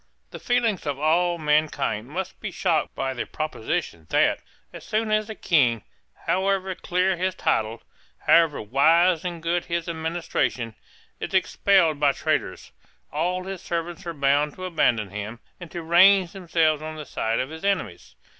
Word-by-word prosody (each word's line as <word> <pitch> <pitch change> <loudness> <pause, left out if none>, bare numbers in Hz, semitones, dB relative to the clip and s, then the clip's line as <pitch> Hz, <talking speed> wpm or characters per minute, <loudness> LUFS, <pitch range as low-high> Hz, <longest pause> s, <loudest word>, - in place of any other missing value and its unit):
The - - -8
feelings 230 -9 0
of 140 -2 -1
all 170 +4 +2
mankind 150 -7 0
must 185 +4 -5
be 215 - -4
shocked 170 -4 0
by 135 0 -2
the 125 - -4
proposition 110 - -4
that, - - +3 0.3
as - - -9
soon 215 0 -1
as 215 0 +1
a 220 - -5
King, 125 - +2 0.4
however 190 0 0
clear 180 +1 0
his 185 +1 -1
title, 110 -8 -1 0.4
however 165 -3 +4
wise 160 - +3
and 175 -3 -5
good 170 +1 0
his 170 -1 -2
administration, 160 -8 -2 0.5
is - - -4
expelled 170 -7 +3
by 145 -2 +3
traitors, 155 -13 -2 0.4
all 180 +4 -1
his 190 -1 -6
servants 170 +1 -4
are 170 - -3
bound 145 +1 +2
to 185 - -6
abandon 120 - +1
him, 105 +3 -6 0.2
and 175 -2 -9
to 170 0 -6
range 180 +2 +5
themselves 165 -5 +1
on 155 0 -6
the 155 -1 -7
side 115 -3 -1
of 130 +3 -3
his 160 +2 -9
enemies. 145 - -2
165 Hz, 160 wpm, -24 LUFS, 145-185 Hz, 0.5 s, range